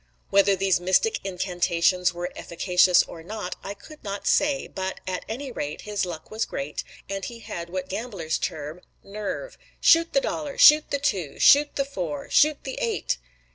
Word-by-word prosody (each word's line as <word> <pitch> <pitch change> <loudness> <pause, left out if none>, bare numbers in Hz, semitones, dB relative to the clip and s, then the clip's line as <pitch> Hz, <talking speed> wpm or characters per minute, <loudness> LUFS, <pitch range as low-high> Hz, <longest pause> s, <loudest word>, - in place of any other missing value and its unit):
Whether 200 0 +5
these 190 -1 +2
mystic 190 - +2
incantations 180 -1 +1
were 175 +1 -5
efficacious 180 +1 +3
or 165 - -10
not 205 +1 -5
I 200 - -6
could 305 +8 -15
not 200 -1 -5
say, 290 -2 +2
but, 190 0 -5
at 185 -1 -3
any 260 +4 -5
rate, 150 -9 -5
his 205 -3 -2
luck 160 -2 -8
was 220 +1 -1
great, 140 +2 -4 0.2
and 195 0 -4
he 235 - -6
had 170 -5 -6
what 185 +1 -4
gamblers 195 -6 -3
term 155 +3 -4 0.2
"nerve." 210 - -6 0.2
"Shoot 330 0 +5
the 275 - +5
dollar!" 295 -1 -4
"Shoot 300 0 +7
the 280 - 0
two!" 195 - -2
"Shoot 290 +1 +6
the 275 - 0
four!" 175 - -5
"Shoot 300 -1 +4
the 265 - -5
eight!" 225 - -1
195 Hz, 175 wpm, -25 LUFS, 175-250 Hz, 0.2 s, Shoot